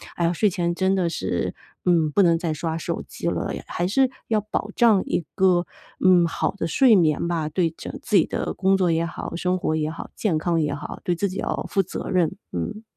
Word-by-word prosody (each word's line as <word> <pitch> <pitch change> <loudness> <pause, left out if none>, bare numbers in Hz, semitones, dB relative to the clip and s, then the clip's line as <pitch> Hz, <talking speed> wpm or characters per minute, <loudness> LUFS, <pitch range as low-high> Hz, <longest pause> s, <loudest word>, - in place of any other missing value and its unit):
“哎 170 - -1
呀， 170 - +2
睡 205 +4 +2
前 175 -2 -1
真 190 +1 +2
的 175 -3 +1
是， 165 - -2 0.3
嗯， 165 -4 +3
不 200 - +3
能 170 -2 +4
再 165 -2 -2
刷 160 +1 -3
手 - - -3
机 - - -6
了， - - -1 0.2
还 175 - -2
是 260 +7 +3 0.2
要 220 -2 +3
保 210 0 -3
障 220 -5 +5
一 170 - -1
个， 180 -2 +3 0.3
嗯， 180 -2 +5
好 165 - -1
的 185 -4 -4
睡 240 - +5
眠 165 -2 +2
吧， 160 -3 -1
对 170 +1 +1
整 - - -8
自 210 - -1
己 165 - +5
的 - - -3
工 190 +1 +2
作 180 -3 +2
也 165 +1 +1
好， 170 - -6
生 180 +1 0
活 155 -3 -1
也 155 0 -1
好， 165 - -7
健 180 -8 0
康 165 0 +1
也 150 - 0
好， - - -7
对 175 - 0
自 200 +4 -1
己 185 - -6
要 - - -2
负 195 - +2
责 185 - -6
任。 180 -4 +2 0.2
“嗯。 90 - -4
175 Hz, 245 characters per minute, -23 LUFS, 165-195 Hz, 0.3 s, 障